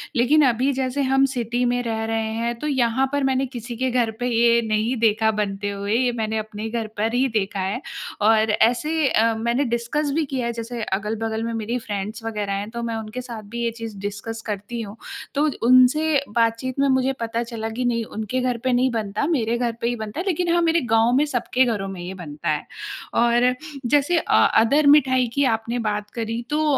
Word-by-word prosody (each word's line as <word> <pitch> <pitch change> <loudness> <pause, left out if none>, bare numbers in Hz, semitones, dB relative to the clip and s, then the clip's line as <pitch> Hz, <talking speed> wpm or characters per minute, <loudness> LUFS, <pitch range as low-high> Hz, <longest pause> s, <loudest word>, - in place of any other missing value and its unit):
लेकिन 285 +5 +4
अभी 255 +2 +2
जैसे 265 +1 -1
हम 270 +1 +3
सिटी 240 0 -1
में 245 0 +1
रह 225 -1 -2
रहे 225 0 -1
हैं 235 +1 -1
तो 300 - -3
यहाँ 260 -2 +2
पर 285 -1 0
मैंने 265 0 +1
किसी 240 -2 -7
के 260 +2 0
घर 240 -2 +1
पे 245 - -1
ये 235 0 +4
नहीं 215 +3 +1
देखा 220 -1 +3
बनते 205 -1 -2
हुए। 200 +1 -3
ये 250 +1 +2
मैंने 220 -2 -2
अपने 215 0 -5
घर 225 -1 -3
पर 220 +2 0
ही 255 +2 +2
देखा 205 -4 -2
है। 195 +7 -2 0.4
और 220 +1 +4
ऐसे 295 +8 +2
अ, 225 +1 +3
मैंने 235 +4 0
डिस्कस 235 +4 -1
भी 320 -1 +1
किया 260 -3 -3
है, 235 - -2
जैसे 230 +1 -5
अगल-बगल 220 +3 -2
में 230 0 -3
मेरी 225 +2 -2
फ़्रेंड्स 210 0 -5
वग़ैरह 210 -3 -3
हैं 200 +2 -3
तो 235 0 -5
मैं 230 -1 -2
उनके 220 +3 -5
साथ 235 -3 -7
भी 235 0 -2
ये 235 - 0
चीज़ 225 -2 -8
डिस्कस 205 +3 -5
करती 210 +4 -5
हूँ। 205 -2 -7 0.4
तो 290 +2 +3
उ - - 0 0.3
उनसे 300 +2 +2
बातचीत 230 +3 +1
में 280 - +4
मुझे 260 0 +2
पता 230 0 -2
चला 230 -2 -5
कि 230 +3 -3
नहीं 235 -1 +1
उनके 220 +3 -3
घर 250 -1 0
पे 260 - +1
नहीं 250 +2 +3
बनता, 215 +1 -2
मेरे 235 -8 +1
घर 240 -1 0
पे 235 - 0
ही 240 - 0
बनता 220 +5 -6
है, 350 - -2
लेकिन 355 -2 0
हाँ 345 - +3
मेरे 335 0 +3
गाँव 225 +1 +4
में 285 +3 +4
सबके 260 -2 +1
घरों 210 -5 -1
में 195 -2 -7
ये 180 +2 -6
बनता 155 -6 -6
है। 150 -1 -1 0.5
और 240 +1 +3 0.3
जैसे 290 +7 +3
अ, - - 0 0.3
अदर 285 +6 +3
मिठाई 260 -3 +3
की 280 - +2
आपने 230 +2 -4
बात 210 0 -3
करी 230 +1 -2
तो 305 +1 +1
235 Hz, 215 wpm, -23 LUFS, 220-255 Hz, 0.5 s, लेकिन